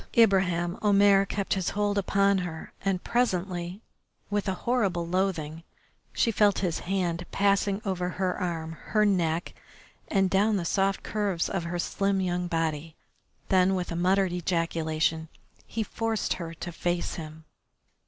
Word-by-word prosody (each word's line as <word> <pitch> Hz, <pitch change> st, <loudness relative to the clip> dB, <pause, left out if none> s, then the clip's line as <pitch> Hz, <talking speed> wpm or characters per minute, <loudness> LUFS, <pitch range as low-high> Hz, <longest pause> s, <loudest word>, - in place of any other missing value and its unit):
Ibraheim 185 Hz, -5 st, +3 dB
Omair 200 Hz, -1 st, +5 dB
kept 200 Hz, 0 st, -1 dB
his 190 Hz, -3 st, -1 dB
hold 205 Hz, -1 st, +1 dB
upon 200 Hz, 0 st, +2 dB
her, 170 Hz, -3 st, -6 dB
and 190 Hz, -2 st, 0 dB
presently, 185 Hz, -5 st, -1 dB, 0.5 s
with 205 Hz, 0 st, 0 dB
a 190 Hz, -, -1 dB
horrible 200 Hz, -9 st, +1 dB
loathing, 170 Hz, -3 st, -1 dB, 0.5 s
she 230 Hz, -, +2 dB
felt 205 Hz, -2 st, +3 dB
his 170 Hz, -, -1 dB
hand 180 Hz, -2 st, -1 dB
passing 200 Hz, 0 st, +1 dB
over 180 Hz, -2 st, -1 dB
her 185 Hz, 0 st, -1 dB
arm, 165 Hz, -3 st, -3 dB
her 215 Hz, -1 st, +2 dB
neck, 170 Hz, -4 st, 0 dB, 0.5 s
and 195 Hz, -2 st, +2 dB
down 205 Hz, +3 st, +2 dB
the 175 Hz, -, -2 dB
soft 195 Hz, +2 st, +1 dB
curves 200 Hz, -5 st, -1 dB
of 190 Hz, -4 st, -2 dB
her 175 Hz, +1 st, -3 dB
slim 195 Hz, +3 st, 0 dB
young 180 Hz, -1 st, -1 dB
body, 165 Hz, -2 st, -2 dB, 0.5 s
then 190 Hz, 0 st, +4 dB
with 180 Hz, -1 st, -3 dB
a -, -, -2 dB
muttered 185 Hz, +1 st, +2 dB
ejaculation 160 Hz, -2 st, -1 dB, 0.4 s
he 225 Hz, -, -2 dB
forced 225 Hz, +1 st, -1 dB
her 165 Hz, 0 st, -6 dB
to 175 Hz, +2 st, -6 dB
face 175 Hz, +1 st, -2 dB
him. 155 Hz, -1 st, -8 dB
185 Hz, 145 wpm, -27 LUFS, 170-200 Hz, 0.5 s, Omair